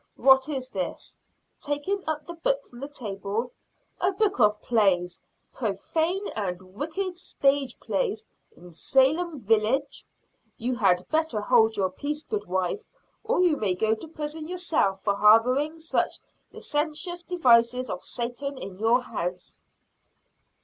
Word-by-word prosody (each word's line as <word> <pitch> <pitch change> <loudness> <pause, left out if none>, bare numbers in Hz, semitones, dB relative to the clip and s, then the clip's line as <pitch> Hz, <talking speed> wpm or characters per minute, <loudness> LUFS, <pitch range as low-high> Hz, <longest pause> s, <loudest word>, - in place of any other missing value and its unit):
"What 265 +1 +5
is 260 -3 -3
this?" 185 -3 -5 0.4
taking 305 +7 -2
up 305 -1 -2
the 345 - -7
book - - -1
from 240 - -14
the 275 - -5
table. 220 -3 -4 0.5
"A 370 - +2
book 395 -5 0
of 210 -2 +4
plays! 185 -6 +1 0.3
profane 320 - -1
and 185 -2 -5
wicked 350 - -3
stage 275 -5 0
plays, 465 -5 -2 0.3
in 175 +1 -15
Salem 280 - +2
village! 225 +6 +1 0.5
You 245 +1 -1
had 185 -6 +2
better 315 -8 0
hold 225 0 +3
your 190 -2 +1
peace, 295 +9 -4
goodwife; 410 - -2 0.4
or 445 -3 +1
you 345 -5 +3
may 195 -4 0
go 220 +4 +2
to 225 +9 -6
prison 310 0 -6
yourself 340 - 0
for 200 - +2
harboring 250 +9 +4
such 320 0 0 0.3
licentious 310 +4 -2
devices 250 -8 +3
of - - -5
Satan 250 +4 -4
in 195 -6 -8
your 230 +3 +3
house." 180 -6 -5
265 Hz, 135 wpm, -26 LUFS, 210-320 Hz, 0.5 s, What